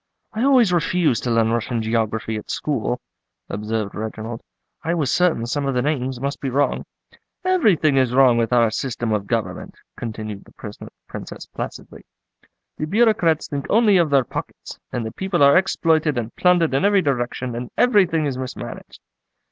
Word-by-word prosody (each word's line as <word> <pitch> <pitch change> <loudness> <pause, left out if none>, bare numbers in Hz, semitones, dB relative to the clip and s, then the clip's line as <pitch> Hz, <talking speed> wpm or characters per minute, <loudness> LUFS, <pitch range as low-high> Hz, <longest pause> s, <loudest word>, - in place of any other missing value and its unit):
"I 220 - -3
always 255 -8 +4
refused 170 -5 +1
to - - 0
learn 115 -1 +2
Russian 115 0 -1
geography 110 0 -1
at 105 - -7
school," 125 -4 -2 0.5
observed 105 0 -3
Reginald; 110 +2 -5 0.4
"I 165 +3 0
was 150 -6 0
certain 175 -10 +2
some 140 +4 -2
of 135 - -1
the 125 - +1
names 135 -4 -1
must 140 +2 -3
be 135 - -2
wrong." 140 +3 0 0.6
"Everything 205 - +3
is 130 -2 +3
wrong 130 -1 +5
with 115 0 0
our 120 -2 +4
system 120 -1 -3
of 105 -2 -1
government," 115 -1 -3 0.2
continued 110 -3 -6
the 105 -1 -10 0.3
Princess - - -8
placidly. - - -8 0.8
"The 155 - -2
Bureaucrats 200 -6 +2
think 140 -2 -4
only 210 -2 +5
of 170 -3 +3
their 140 -2 +4
pockets, - - -7
and 120 -2 -3
the 110 - -4
people 190 - 0
are 140 0 +7
exploited 160 -5 +2
and 115 -1 -4
plundered 175 -5 +3
in 135 - +1
every 200 -1 +4
direction, 125 -2 -2
and 120 +1 -5
everything 190 -10 +3
is 135 -3 -2
mismanaged." 130 -1 -7
135 Hz, 165 wpm, -21 LUFS, 115-165 Hz, 0.8 s, are